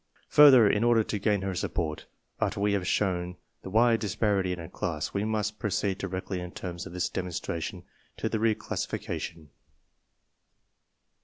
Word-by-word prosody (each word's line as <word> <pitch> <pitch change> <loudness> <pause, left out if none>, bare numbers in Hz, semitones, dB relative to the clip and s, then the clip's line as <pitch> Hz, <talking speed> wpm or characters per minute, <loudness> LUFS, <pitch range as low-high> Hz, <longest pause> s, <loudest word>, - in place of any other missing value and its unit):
Further, 135 -7 +8
in 105 +2 +2
order 120 -2 +4
to 105 - -3
gain 100 -1 +1
her 95 -1 -2
support, 80 -3 -3 0.3
after - - -1
we 100 0 +2
have 95 -3 -1
shown 90 -3 0 0.2
the - - -8
wide 115 +2 +4
disparity 100 -2 0
in 90 - -3
a 85 - -7
class, 80 -3 -3
we 100 - 0
must 105 -1 -2
pro 105 0 -1
ceed 95 0 -1
directly 95 0 -4
in 90 0 -7
terms 90 -1 -6
of 90 - -10
this 90 0 0
demonstration 90 -2 -4 0.3
to - - -1
the 110 -1 -1
re 110 0 +3
classification. 80 -6 -5
100 Hz, 165 wpm, -28 LUFS, 90-105 Hz, 0.3 s, Further